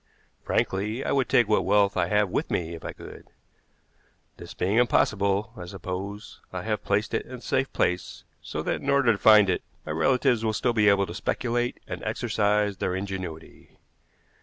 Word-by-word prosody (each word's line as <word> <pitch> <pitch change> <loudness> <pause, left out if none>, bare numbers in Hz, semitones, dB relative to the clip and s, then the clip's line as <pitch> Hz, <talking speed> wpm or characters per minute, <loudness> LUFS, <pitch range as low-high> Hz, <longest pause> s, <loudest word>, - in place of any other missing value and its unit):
Frankly, 105 +7 -1
I - - -1
would 135 -2 +1
take 120 - +4
what 105 - +2
wealth 100 0 +3
I 90 -2 +1
have 105 +1 +2
with - - -2
me 85 -1 -2
if 85 - -9
I - - -4
could. - - -12 1.1
This - - -10
being 100 +5 0
impossible, 100 -4 +2
I 90 - -8
suppose, 100 +2 -7
I 90 -1 -5
have 105 -2 -2
placed 105 +2 0
it - - -1
in 130 - -8
a 125 - -11
safe 135 +1 -1
place, 90 0 -1 0.2
so - - -5
that, - - -2
in - - -3
order 140 -4 +4
to 100 - -2
find 105 -2 +7
it, 90 - 0 0.2
my 80 - -4
relatives 120 - +2
will 110 -1 0
still 120 +2 0
be 105 -2 +4
able 100 -1 +3
to 85 - -8
speculate 120 +5 -2
and - - -6
exercise 105 -1 0
their 90 0 -1
ingenuity. 95 -4 -7
105 Hz, 185 wpm, -26 LUFS, 95-115 Hz, 1.1 s, find